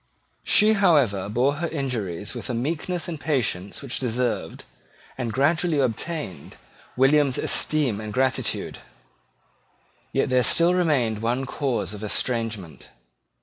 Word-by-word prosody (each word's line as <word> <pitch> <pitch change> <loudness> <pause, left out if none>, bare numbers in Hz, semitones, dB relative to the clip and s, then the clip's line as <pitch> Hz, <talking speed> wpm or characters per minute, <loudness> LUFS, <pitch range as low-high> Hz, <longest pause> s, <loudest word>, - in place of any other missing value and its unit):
She, 215 +1 +5
however, 140 - +3
bore 130 +6 +1
her 170 +2 -2
injuries 110 - -3
with - - -7
a 120 - -1
meekness 160 +7 -2
and 165 -3 -5
patience 120 - -1
which 135 -2 -4
deserved, 125 -1 -2 0.5
and 120 -3 -3
gradually 155 +6 +2
obtained, 130 - -3 0.4
William's 135 0 +4
esteem 135 -9 +1
and 110 -1 -6
gratitude. 130 +2 -1 1.3
Yet - - 0
there 130 0 +3
still 170 +8 +4
remained 135 -12 +1
one 120 +4 -1
cause 130 -5 -2
of 105 0 -8
estrangement. 110 -5 -3
130 Hz, 120 wpm, -24 LUFS, 110-150 Hz, 1.3 s, She